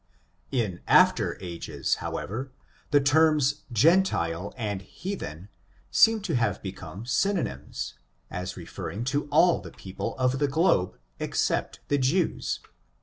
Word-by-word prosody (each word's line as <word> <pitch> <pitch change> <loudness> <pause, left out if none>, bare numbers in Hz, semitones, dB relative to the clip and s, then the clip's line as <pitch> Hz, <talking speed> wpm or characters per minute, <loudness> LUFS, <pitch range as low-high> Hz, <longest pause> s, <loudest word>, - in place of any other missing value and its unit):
In 105 -9 -1
after - - +4
ages, 85 -2 -2
however, 130 +7 -4 0.4
the 145 - +5
terms 145 0 +3
gentile 110 - +2
arid 105 -5 -2
hea 180 - -6
then 85 - -7 0.4
seem 225 -1 +5
to 185 -6 -2
have 115 -5 +1
become 95 +1 -7
synonymous, 125 - -1 0.4
as 90 +1 -5
referring 105 +4 -6
to 140 +3 -1
all 160 +4 +4
the - - -9
people 95 -1 -6
of 130 +1 +1
the 145 - +2
globe, 140 - +2 0.2
except - - -1
the 145 - +2
Jews. 155 +7 0
130 Hz, 125 wpm, -27 LUFS, 95-155 Hz, 0.4 s, the